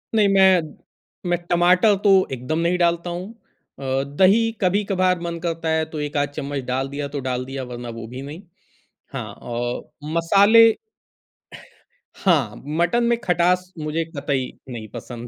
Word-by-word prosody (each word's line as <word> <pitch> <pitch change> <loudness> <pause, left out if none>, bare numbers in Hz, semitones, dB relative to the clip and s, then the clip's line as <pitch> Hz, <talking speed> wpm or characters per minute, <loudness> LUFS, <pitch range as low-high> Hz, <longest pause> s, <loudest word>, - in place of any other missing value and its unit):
नहीं 210 -2 +4
मैं, 190 -2 +6 0.7
मैं 175 - +2
टमाटर 180 +4 +4
तो 205 - +5 0.2
एकदम 130 +5 -2
नहीं 170 +2 +1
डालता 170 0 +1
हूँ। 175 +3 -5 0.5
अ, 135 0 -1 0.2
दही 220 +5 +5
कभी-कभार 185 -1 +1
मन 170 -1 -4
करता 165 -1 -2
है 160 0 +2
तो 155 - -6
एक-आध 145 -1 -1
चम्मच 140 0 -3
डाल 130 +2 -1
दिया 140 +1 -4
तो 140 0 -5
डाल 125 0 -2
दिया 135 0 -5
वरना 120 -1 -7
वो 115 - -7
भी 125 +3 -8
नहीं। 145 +6 -8 0.7
हाँ - - -5 0.2
और 120 +1 -3 0.3
मसाले 205 +7 +6 1.5
हाँ, 145 - +2
मटन 170 +10 +1
में 235 0 +2
खटास 180 +1 +1
मुझे 155 +2 -2
कतई 140 -4 -3 0.2
नहीं 115 -3 -7
पसंद। 120 -1 -8
165 Hz, 150 wpm, -22 LUFS, 135-180 Hz, 1.5 s, मैं